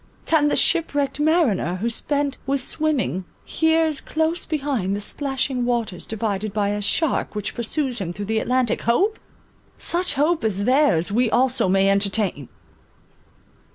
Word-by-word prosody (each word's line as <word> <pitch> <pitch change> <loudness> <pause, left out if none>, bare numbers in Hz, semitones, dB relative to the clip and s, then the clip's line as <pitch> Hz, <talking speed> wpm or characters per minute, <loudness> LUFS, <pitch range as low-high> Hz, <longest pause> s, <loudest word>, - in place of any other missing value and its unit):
Can 310 -2 +3
the - - +1
ship 330 -4 +2
wrecked 285 0 -1
mariner, 295 - +2
who 205 +5 -2
spent 280 +4 -1
with 275 0 +1
swimming, 265 - -1 0.2
hears 320 -2 +1
close 320 +2 -1
behind 270 - -1
the - - -3
splashing 265 +2 -2
waters 235 -7 -2
divided 215 -2 -2
by 205 -1 0
a 205 0 -2
shark 290 +4 0
which 210 -1 -3
pursues 245 +1 -1
him 175 -3 -3
through 205 +3 -6
the 220 +2 0
Atlantic, 250 0 0
hope? 390 - +1 0.6
Such 355 +1 -1
hope 310 +3 +1
as 200 -2 0
theirs, 255 - +3
we 235 +2 +2
also 250 -4 +2
may 195 +1 +3
entertain! 200 - 0
245 Hz, 150 wpm, -22 LUFS, 205-295 Hz, 0.6 s, Can